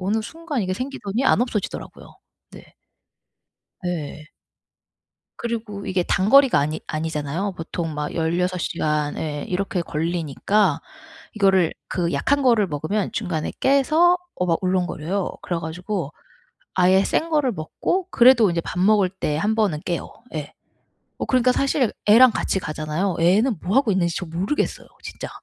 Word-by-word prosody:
어느 205 +4 0
순간 300 +1 -4
이게 185 - -2
생기더니 255 -1 -3
안 265 - +4
없어지더라고요. 235 -5 -4 0.4
네. - - -15 1.1
네. 155 -3 -4 1.1
그리고 220 -4 -4
이게 185 -2 0
단거리가 245 - +4
아니 150 +2 -2
아니잖아요. 160 +4 -3
보통 165 -1 -4
막 150 0 -4
16 180 +3 0
시간 150 -3 -1
예 150 -2 -4
이렇게 195 0 -1
걸리니까 165 +3 0 0.5
이거를 190 -5 +3
그 175 -2 -1
약한 280 - +1
거를 230 -7 +3
먹으면 155 +7 -2
중간에 175 -8 -3
깨서 310 +6 +4 0.2
어 180 - +1
막 165 -1 +1
울렁거려요. 185 0 -1
그래 175 -2 -2
가지고 170 0 -4 0.6
아예 185 +1 +4
센 325 +10 0
거를 295 -5 +2
먹고 240 - -2
그래도 240 -4 +6
인제 170 -1 -1
밥 180 - -5
먹을 200 0 +4
때 165 -5 -2
1 210 +7 +1
번은 195 -9 +1
깨요. 175 - -3 0.2
예. 150 -3 -5 0.7
어 - - -2
그러니까 255 -1 +3
사실 270 -2 +1
애랑 230 +4 +7
같이 195 - -1
가잖아요. 155 +4 -2
애는 205 +7 +3
뭐 195 +7 -1
하고 270 -5 +4
있는지 170 -3 +1
저 185 - -4
모르겠어요 180 - -2 0.2
진짜. - - -7
185 Hz, 305 characters per minute, -22 LUFS, 165-225 Hz, 1.1 s, 애랑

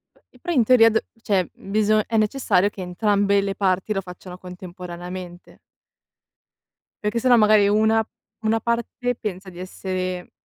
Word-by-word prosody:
P - - -30
e - - -22
però, 345 - -3
in 250 -6 +4
teoria, 225 -1 +6
d 220 - 0 0.2
cioè, 190 -4 +1 0.2
biso 215 0 +3
è 225 - -1
necessario 210 -3 +2
che 195 - -10
entrambe 200 +2 +1
le 195 0 -3
parti 190 +1 0
lo 195 - -2
facciano 180 0 -11
contemporaneamente. 180 0 -9 1.5
Perché 210 +3 0
se 255 - -1
no, 245 -1 +6
magari, 210 -2 +5
una 220 +2 +3 0.4
una 225 0 +1
parte 235 +1 -2
pensa 190 -3 -5
di 175 -1 -12
essere 185 -1 -4
200 Hz, 155 wpm, -22 LUFS, 185-220 Hz, 1.5 s, teoria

